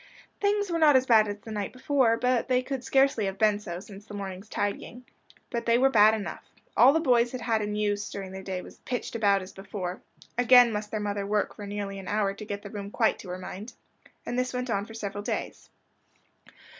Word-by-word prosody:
Things 405 -1 +1
were 335 - 0
not 300 -3 +6
as 260 0 +4
bad 220 -4 +5
as 205 0 -4
the 225 - -9
night 205 -2 -3
before 255 -3 +2
they 250 0 +1
could 265 -1 -4
scarcely 270 -4 +3
have 195 0 -3
been 210 0 +3
so, 175 -4 -6
since 200 +1 -12
the 205 - -8
morning's 195 +1 -6
tidying. 205 +4 -3 0.5
But 235 -1 -3
they 230 0 +5
were 270 +2 +4
bad 215 -2 +6
enough. 205 -5 -6 0.3
All 250 +4 +7
the 320 - +2
boys 245 -5 +3
had 255 - -4
had 225 -2 +1
in 210 0 -2
use 205 -1 -1
during 195 -2 -6
the 190 0 -7
day 185 -1 -4
was - - -14
"pitched 245 -1 -4
about" 200 -4 +2
as 185 - -11
before 195 -2 -6 0.4
again 245 -1 +7
must 210 0 -3
their 215 - -3
mother 205 -1 -2
work 210 0 0
for 205 -2 -8
nearly 200 -1 -4
an 190 - -9
hour 205 -2 0
to 215 +2 -9
get 205 0 -5
the 200 - -9
room 200 -1 -6
quite 220 +1 +1
to 185 - -10
her 180 - -4
mind. 200 +5 -8 0.5
And 245 - -2
this 255 0 -2
went 250 -1 -2
on 200 -1 0
for 225 - -11
several 205 -2 -4
days. - - -4
210 Hz, 225 wpm, -27 LUFS, 200-245 Hz, 0.5 s, All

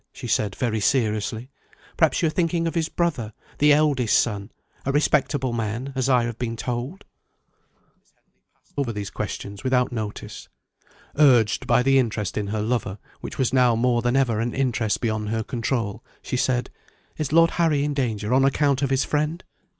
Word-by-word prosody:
she - - -10
said 100 -2 0
very 115 -3 -1
seriously. 110 +1 0 0.4
"Perhaps - - +2
you - - +4
are - - 0
thinking 170 0 0
of 165 - -1
his 165 -2 -1
brother 140 -11 -2 0.3
the 150 +1 +5
eldest 145 -6 +3
son 105 -2 -1 0.3
a 135 - -1
respectable 140 -3 +1
man, 115 +4 -3
as 130 0 0
I 125 -2 +4
have 120 -1 -4
been 115 -2 -2
told?" 125 +10 -4 0.9
Miss - - -37
Henley - - -44 0.2
passed - - -34
over 125 -5 -1
these 105 0 -5
questions 100 -1 -6
without 130 -1 +1
notice. 110 -3 -6 0.7
Urged 125 -8 +4
by 125 - +4
the 135 +1 +4
interest 110 -5 -2
in 105 -1 -2
her 105 +1 -2
lover, 110 -4 -2 0.2
which - - -8
was 130 -1 0
now 125 -3 +4
more 120 +1 +2
than 120 +1 0
ever 125 -5 +2
an 115 +1 -2
interest 120 -5 0
beyond 110 -2 -1
her 110 0 -1
control, 115 -2 -3 0.2
she - - -3
said: 125 0 0 0.5
"Is 150 -3 -3
Lord 165 +1 +5
Harry 150 -4 +2
in 145 0 -1
danger, 115 -5 -1
on 135 +1 +4
account 140 0 +2
of 140 - +1
his 135 0 +2
friend?" 155 +4 -1
125 Hz, 180 wpm, -24 LUFS, 110-140 Hz, 0.9 s, the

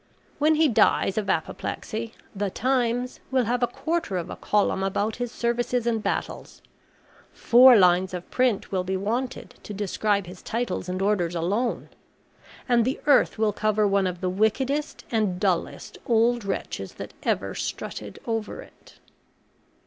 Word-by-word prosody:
When 310 +2 +4
he 315 0 +4
dies 210 -5 +3
of 205 - -4
apoplexy, 220 +7 -3 0.2
THE 200 0 -1
TIMES 250 +1 0
will 260 -1 +2
have 245 +3 0
a 245 - +3
quarter 300 - -2
of 170 - -4
a - - -5
column 205 -2 +1
about 200 +3 -1
his 245 -1 -3
services 240 0 -1
and 230 -2 0
battles - - -4 0.7
four 250 +1 +7
lines 185 -1 +4
of 180 - -7
print 250 -5 +1
will 185 -2 0
be 190 +1 -2
wanted 240 +6 -3
to 210 - -8
describe 205 0 0
his 180 +1 -11
titles 230 -5 -3
and 185 +1 -2
orders 180 -4 +1
alone 200 +9 -1 0.8
and 240 -2 +4
the 255 +4 -1
earth 285 -4 +4
will 215 -1 +1
cover 215 0 +1
one 195 -1 +2
of 180 0 -5
the 185 - 0
wickedest 260 +9 0
and 210 -6 0
dullest 185 -4 -2
old 235 -1 +2
wretches 195 - -4
that - - -8
ever - - -1
strutted - - -5
over 225 - -3
it. - - -20
220 Hz, 155 wpm, -25 LUFS, 195-245 Hz, 0.8 s, four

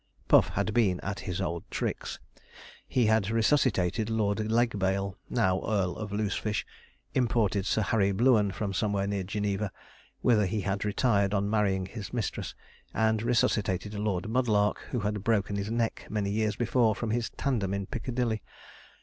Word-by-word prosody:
Puff - - +6
had 100 +1 -1
been 100 -6 +2
at 100 +1 -4
his 90 0 -4
old 85 -3 -2
tricks. - - -3 0.7
He 125 -3 +2
had 110 -2 +3
resuscitated 115 -4 +2
Lord 110 -2 0
Legbail, 100 -5 +1
now 95 0 +2
Earl 95 -5 0
of 105 -2 -5
Loosefish; 105 0 -1 0.5
imported 105 -6 +1
Sir 110 - +2
Harry 100 -2 +2
Blueun 110 0 +4
from 100 +2 -3
somewhere 100 -1 0
near 100 -1 -1
Geneva, 100 +1 -2 0.5
whither 105 -5 +4
he 105 +2 -1
had 100 +2 -2
retired 105 -2 +2
on 100 +1 0
marrying 100 -3 +1
his 100 +2 -8
mistress; 115 -6 -3 0.4
and 110 -1 +2
resuscitated 105 -4 +1
Lord 105 -2 -1
Mudlark, 110 -3 +2
who 125 - -2
had 105 -1 -2
broken 105 -3 +1
his 100 +1 -2
neck 115 0 -1
many 105 -2 -1
years 105 0 0
before 120 -2 +2
from 115 -1 -3
his 115 0 0
tandem 110 -9 0
in 100 0 -2
Piccadilly. 120 -2 -2
105 Hz, 155 wpm, -29 LUFS, 100-110 Hz, 0.7 s, Puff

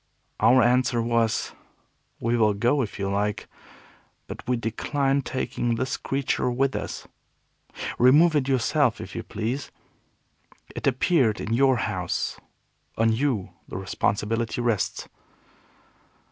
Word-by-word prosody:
Our 120 +3 +5
answer 125 0 +2
was, 115 -1 0 0.7
"We 115 +1 0
will 110 -3 +3
go 120 +7 +2
if 110 - -4
you 100 - -2
like, 105 +1 -1 0.8
but - - -8
we 125 -1 +1
decline 135 +5 0
taking 120 -2 -2
this 130 +3 -2
creature 135 -2 -1
with 130 0 0
us. 100 -1 -5 0.9
Remove 150 +7 +6
it 140 -3 +1
yourself 135 -1 +2
if - - -8
you - - -3
please. 120 +6 -4 1.1
It - - -3
appeared 130 - +2
in 110 - -3
your 130 +1 +4
house. 95 -6 -2 0.6
On 115 0 +3
you 120 -5 -1 0.2
the - - -6
responsibility 105 +4 -1
rests." 105 -4 -1
120 Hz, 120 wpm, -25 LUFS, 110-130 Hz, 1.1 s, Remove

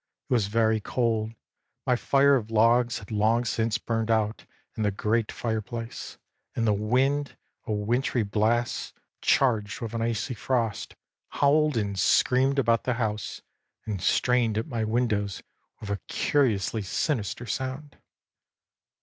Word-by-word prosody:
It - - -1
was 110 -5 +2
very 110 +1 +2
cold; 115 -1 -1 0.5
my 125 -2 +3
fire 140 +3 +4
of 110 -4 -2
logs 115 +2 +3
had 100 - -11
long 110 +3 +2
since 110 0 0
burned 115 -1 -2
out 110 -1 0 0.3
in - - -4
the 105 - +2
great 105 +3 0
fireplace; 115 +1 -5 0.4
and 115 - 0
the 105 - +3
wind, 130 +7 0 0.3
a - - -2
wintry 115 +4 0
blast, 110 +3 0 0.3
charged 110 -6 +2
with 115 -1 -5
an 115 - -2
icy 115 +2 -1
frost, 115 -2 -2 0.3
howled 150 -1 +2
and 100 -3 -1
screamed 130 +9 +3
about 115 -4 +2
the 125 - 0
house 110 -3 -3 0.4
and 105 -4 -4
strained 120 -1 +2
at 110 - -1
my 115 -3 -3
windows 110 -4 -1 0.4
with 105 - -6
a 100 - 0
curiously 110 -6 +1
sinister 115 - -2
sound. 130 +6 -4
115 Hz, 140 wpm, -27 LUFS, 105-125 Hz, 0.5 s, fire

